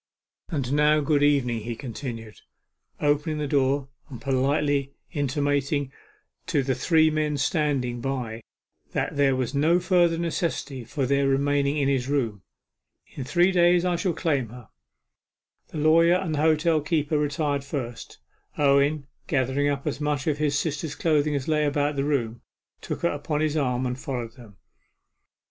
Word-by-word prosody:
'And 140 Hz, -6 st, -2 dB
now, 150 Hz, +1 st, +4 dB
good 145 Hz, 0 st, +1 dB
evening,' 135 Hz, -5 st, +2 dB
he 115 Hz, +2 st, -5 dB
continued, 115 Hz, -3 st, -7 dB, 0.6 s
opening 150 Hz, +1 st, +1 dB
the 150 Hz, -, -2 dB
door 135 Hz, 0 st, +1 dB, 0.2 s
and 125 Hz, -4 st, -8 dB
politely 140 Hz, +1 st, 0 dB, 0.2 s
intimating 145 Hz, 0 st, 0 dB, 0.6 s
to 140 Hz, -, +1 dB
the 130 Hz, 0 st, 0 dB
three 160 Hz, +3 st, +3 dB
men 150 Hz, -1 st, 0 dB
standing 135 Hz, -6 st, 0 dB
by 125 Hz, -4 st, -3 dB, 0.5 s
that -, -, -2 dB
there 140 Hz, -2 st, +3 dB
was 130 Hz, 0 st, -2 dB
no 160 Hz, +5 st, +3 dB
further 175 Hz, -2 st, +3 dB
necessity 165 Hz, -6 st, -2 dB
for 135 Hz, +4 st, -2 dB
their 140 Hz, +1 st, +2 dB
remaining 140 Hz, +1 st, +1 dB
in 140 Hz, -2 st, +1 dB
his 135 Hz, -2 st, 0 dB
room. 115 Hz, -9 st, -1 dB, 0.7 s
'In 135 Hz, -, -7 dB
three 175 Hz, +7 st, +3 dB
days 175 Hz, -1 st, +4 dB
I 180 Hz, -1 st, +1 dB
shall 175 Hz, +1 st, -1 dB
claim 145 Hz, -, -1 dB
her.' 120 Hz, -2 st, -12 dB, 1.0 s
The -, -, -8 dB
lawyer 165 Hz, +3 st, +5 dB
and 180 Hz, -3 st, -1 dB
the 150 Hz, -, 0 dB
hotel 160 Hz, 0 st, +3 dB
keeper 150 Hz, 0 st, 0 dB
retired 145 Hz, -1 st, -1 dB
first. 130 Hz, -4 st, -6 dB, 0.4 s
Owen, 140 Hz, +1 st, +3 dB, 0.2 s
gathering 135 Hz, 0 st, +1 dB
up 140 Hz, -1 st, -2 dB
as 150 Hz, -1 st, -3 dB
much 150 Hz, -2 st, -1 dB
of 150 Hz, -2 st, 0 dB
his 145 Hz, -2 st, +1 dB
sister's 150 Hz, 0 st, -3 dB
clothing 150 Hz, -2 st, +1 dB
as 135 Hz, -2 st, -3 dB
lay 155 Hz, -1 st, +2 dB
about 145 Hz, 0 st, 0 dB
the 135 Hz, -, 0 dB
room, 120 Hz, -6 st, -1 dB, 0.4 s
took -, -, -5 dB
her -, -, +3 dB
upon 150 Hz, -, -2 dB
his 155 Hz, -1 st, 0 dB
arm, 130 Hz, -4 st, 0 dB
and 125 Hz, +1 st, -3 dB
followed 120 Hz, -4 st, -4 dB
them. 110 Hz, -6 st, -15 dB
145 Hz, 160 wpm, -25 LUFS, 130-155 Hz, 1.0 s, lawyer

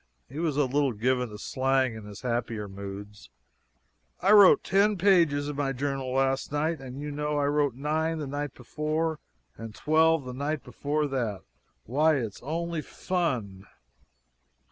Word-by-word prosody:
(he 140 Hz, +5 st, -7 dB
was 160 Hz, -4 st, 0 dB
a 145 Hz, -, +4 dB
little 135 Hz, 0 st, +1 dB
given 125 Hz, +3 st, 0 dB
to 105 Hz, -, -9 dB
slang 130 Hz, +2 st, +1 dB
in 110 Hz, -1 st, -9 dB
his 105 Hz, -1 st, -10 dB
happier 115 Hz, -4 st, -2 dB
moods.) 100 Hz, -, -9 dB, 0.9 s
"I 195 Hz, -, +3 dB
wrote 205 Hz, -3 st, +8 dB
ten 200 Hz, +1 st, +3 dB
pages 170 Hz, -7 st, +3 dB
in 145 Hz, -, -4 dB
my 140 Hz, -1 st, -1 dB
journal 135 Hz, 0 st, -2 dB
last 135 Hz, +1 st, 0 dB
night 155 Hz, +2 st, 0 dB
and 130 Hz, 0 st, -8 dB
you 150 Hz, 0 st, -5 dB
know 150 Hz, +1 st, -2 dB
I 145 Hz, -, +1 dB
wrote 145 Hz, -3 st, +1 dB
nine 155 Hz, +4 st, -1 dB
the 150 Hz, -, -4 dB
night 145 Hz, 0 st, -4 dB
before 155 Hz, +4 st, -2 dB, 0.4 s
and 115 Hz, -2 st, -8 dB
twelve 160 Hz, -1 st, +3 dB
the 125 Hz, -, -6 dB
night 145 Hz, +2 st, -2 dB
before 145 Hz, +5 st, -2 dB
that. 120 Hz, -9 st, -2 dB, 0.4 s
Why, 150 Hz, +6 st, +3 dB
it's 115 Hz, -7 st, -4 dB
only 165 Hz, +3 st, -3 dB
fun!" 125 Hz, -, -3 dB
140 Hz, 160 wpm, -27 LUFS, 125-155 Hz, 0.9 s, wrote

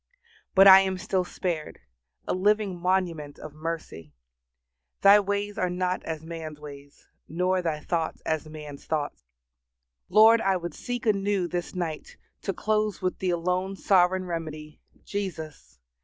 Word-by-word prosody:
But 195 Hz, +1 st, +8 dB
I 190 Hz, 0 st, +11 dB
am 190 Hz, -1 st, 0 dB
still 185 Hz, 0 st, -1 dB
spared, 175 Hz, -3 st, -4 dB, 0.5 s
a -, -, 0 dB
living 205 Hz, 0 st, +1 dB
monument 170 Hz, -5 st, -1 dB
of 155 Hz, -, -10 dB
mercy. 155 Hz, -, -6 dB, 0.9 s
Thy 200 Hz, +1 st, +8 dB
ways 205 Hz, +1 st, -2 dB
are 180 Hz, -, +1 dB
not 180 Hz, +1 st, -1 dB
as 160 Hz, -1 st, -5 dB
man's 160 Hz, -2 st, -7 dB
ways, 145 Hz, -1 st, -12 dB, 0.2 s
nor 180 Hz, +3 st, 0 dB
Thy 160 Hz, -3 st, -2 dB
thoughts 165 Hz, -1 st, -2 dB
as 160 Hz, -1 st, -2 dB
man's 150 Hz, -2 st, -9 dB
thoughts. 150 Hz, -, -2 dB, 0.9 s
Lord, 225 Hz, +2 st, +7 dB
I 195 Hz, -1 st, +2 dB
would 175 Hz, -2 st, -6 dB
seek 245 Hz, +6 st, -5 dB
anew 200 Hz, -3 st, +1 dB
this 175 Hz, +1 st, -4 dB
night 165 Hz, -4 st, -5 dB, 0.2 s
to -, -, -2 dB
close 215 Hz, +1 st, -1 dB
with 185 Hz, -, -1 dB
the 185 Hz, -, -1 dB
alone 180 Hz, +3 st, -1 dB
Sovereign 185 Hz, -1 st, +3 dB
remedy! 155 Hz, -3 st, -6 dB, 0.2 s
Jesus! 180 Hz, -7 st, -6 dB
180 Hz, 140 wpm, -26 LUFS, 155-195 Hz, 0.9 s, I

